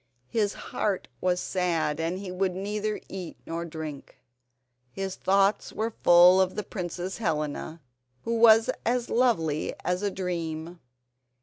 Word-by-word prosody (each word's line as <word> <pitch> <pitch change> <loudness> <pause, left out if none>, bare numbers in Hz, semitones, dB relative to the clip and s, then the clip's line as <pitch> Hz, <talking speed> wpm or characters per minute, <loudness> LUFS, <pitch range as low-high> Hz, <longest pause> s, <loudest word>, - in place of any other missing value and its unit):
His 210 -3 +1
heart 200 -3 -2
was 180 -1 +1
sad 170 -6 -1
and 165 +3 -1
he 190 -1 -6
would 185 0 -1
neither 210 +2 -2
eat 185 -3 -7
nor 165 +1 -4
drink. 155 -3 -7 0.7
His 195 +6 -4
thoughts 195 +1 +2
were 225 +1 -2
full 175 +2 +8
of 185 0 0
the 210 - -2
Princess 180 0 -5
Helena, 155 -3 -2 0.4
who 230 - -1
was 225 -1 +7
as 240 0 0
lovely 165 -12 +1
as 180 +1 0
a 205 - +1
dream. 170 -3 -4
185 Hz, 135 wpm, -27 LUFS, 165-205 Hz, 0.7 s, full